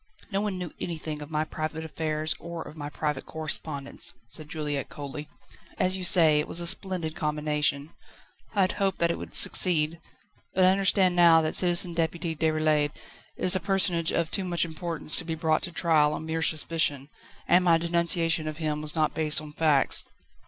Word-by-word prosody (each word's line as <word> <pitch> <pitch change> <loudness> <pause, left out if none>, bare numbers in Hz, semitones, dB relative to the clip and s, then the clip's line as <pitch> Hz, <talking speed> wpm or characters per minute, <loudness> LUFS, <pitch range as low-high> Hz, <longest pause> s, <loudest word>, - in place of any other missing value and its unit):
"No 195 0 -1
one 205 -3 -3
knew 180 -3 -6
anything 155 -3 -5
of 145 - -9
my 155 -1 -1
private 155 0 -5
affairs 155 0 -2
or 170 -1 -7
of - - -12
my 145 -2 -7
private 150 -2 -4
correspondence," 155 -3 -1
said 155 +3 -6
Juliette 150 -3 -4
coldly; 145 +1 -8 0.5
"as 185 +1 +1
you 190 - -5
say, 165 -4 +7
it 150 - -2
was - - +1
a 170 - -2
splendid 175 -3 -2
combination. 150 -1 -1 0.6
I 200 - +2
had 185 - +2
hoped 195 -2 -1
that 170 0 +1
it - - -5
would - - -9
succeed. 165 -2 +4 0.5
But 185 - +3
I - - +6
understand 190 -1 +2
now 170 -2 +5
that 155 - -2
Citizen 175 -1 +2
Deputy 165 0 -2
Déroulède 155 -1 0 0.4
is 185 - +5
a - - +1
personage 175 -2 +1
of 165 -1 -1
too 195 - -1
much 175 -2 0
importance 165 -1 +1
to - - +2
be 165 0 -4
brought 160 -1 0
to 180 - -6
trial 155 -3 +2
on 160 - -6
mere 160 0 -3
suspicion, 155 -3 +1 0.4
and 180 +1 +4
my 170 -2 +4
denunciation 170 -1 +1
of 155 0 -5
him 155 -2 -3
was 155 +1 -3
not 155 -1 0
based 155 -1 0
on 155 -1 -10
facts." 150 -3 +1
160 Hz, 190 wpm, -26 LUFS, 150-175 Hz, 0.6 s, say